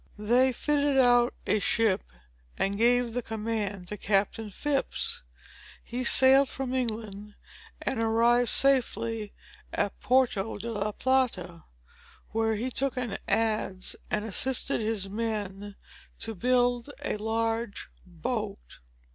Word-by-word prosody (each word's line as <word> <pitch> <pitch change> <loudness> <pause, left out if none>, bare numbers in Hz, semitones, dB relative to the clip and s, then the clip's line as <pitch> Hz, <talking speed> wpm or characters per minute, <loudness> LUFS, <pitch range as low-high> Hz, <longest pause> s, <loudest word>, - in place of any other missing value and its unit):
They 245 +5 +3
fitted 285 +2 +1
out 245 -2 +5
a 215 - +2
ship 215 -2 +2 0.6
and 195 +1 0
gave 240 +2 +3
the 245 - -1
command 215 -4 -3
to 210 - -5
Captain 210 +2 0
Phips. 280 +7 -2 0.6
He 245 +2 -4
sailed 265 +2 +6
from 265 -2 -4
England, 215 -4 -3 0.5
and 265 - -1
arrived 235 +2 +3
safely 230 -5 +1 0.4
at 200 - -2
Porto 240 -5 +1
de 230 +3 -5
la 210 -1 -1
Plata, 205 -10 0 0.7
where 225 0 +1
he 245 +5 -3
took 270 0 -2
an 240 -5 -2
adze 215 -4 -1
and 210 0 -1
assisted 240 +3 -1
his 215 -3 -1
men 205 -2 -4 0.4
to 225 - -4
build 245 +4 +1 0.2
a - - -1
large 225 0 -2 0.2
boat. 200 +4 -5
225 Hz, 120 wpm, -28 LUFS, 210-245 Hz, 0.7 s, sailed